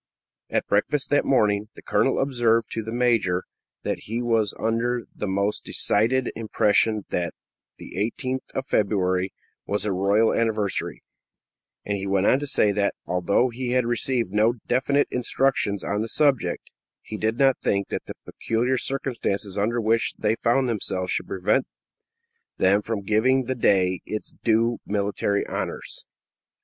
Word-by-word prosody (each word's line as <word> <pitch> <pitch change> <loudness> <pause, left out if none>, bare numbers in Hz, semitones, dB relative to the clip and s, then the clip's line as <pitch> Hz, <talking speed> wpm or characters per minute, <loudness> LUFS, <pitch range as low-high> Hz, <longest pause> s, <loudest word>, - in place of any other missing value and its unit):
At - - 0
breakfast 135 +9 0
that 145 - +3
morning, 105 -5 +2
the - - -13
colonel 115 +6 +1
observed 120 -4 +1
to 115 - -2
the 110 +1 -6
major 115 -7 +1 0.4
that - - -2
he 115 +3 -3
was 115 -4 +1
under 115 +2 0
the 105 - -3
most 100 +2 -1
decided 120 +5 +1
impression 110 -1 +1
that 85 -1 -2 0.4
the - - -11
18th 130 +5 -2
of 135 - -2
February 95 -4 +1 0.4
was 105 0 -1
a 105 - 0
royal 100 +4 +3
anniversary; 110 -3 -1 0.8
and 100 0 -1
he 100 0 -4
went 95 0 +1
on 130 - +4
to 145 - -4
say 105 -6 +3
that, 100 0 0
although 90 +8 +1
he 125 +1 -3
had 125 -1 +2
received 120 -2 0
no 110 +3 +3
definite 140 +3 +2
instructions 125 -5 0
on 105 +1 -1
the 110 - -2
subject, 135 - +1 0.3
he 110 - -7
did 110 +2 -1
not 135 -2 +3
think 100 0 0
that - - -4
the - - -7
peculiar 120 +3 -1
circumstances 115 -8 -2
under 110 +4 0
which 115 +1 +1
they 105 0 +1
found 120 +3 +1
themselves 95 -5 -1
should - - -2
prevent 95 +8 +1 0.9
them 100 +2 +3
from 105 -1 -3
giving 120 +6 +2
the 130 +1 -2
day 95 -6 +2
its 110 - -5
due 115 +1 +1
military 100 0 0
honors. - - -5
110 Hz, 155 wpm, -24 LUFS, 100-120 Hz, 0.9 s, on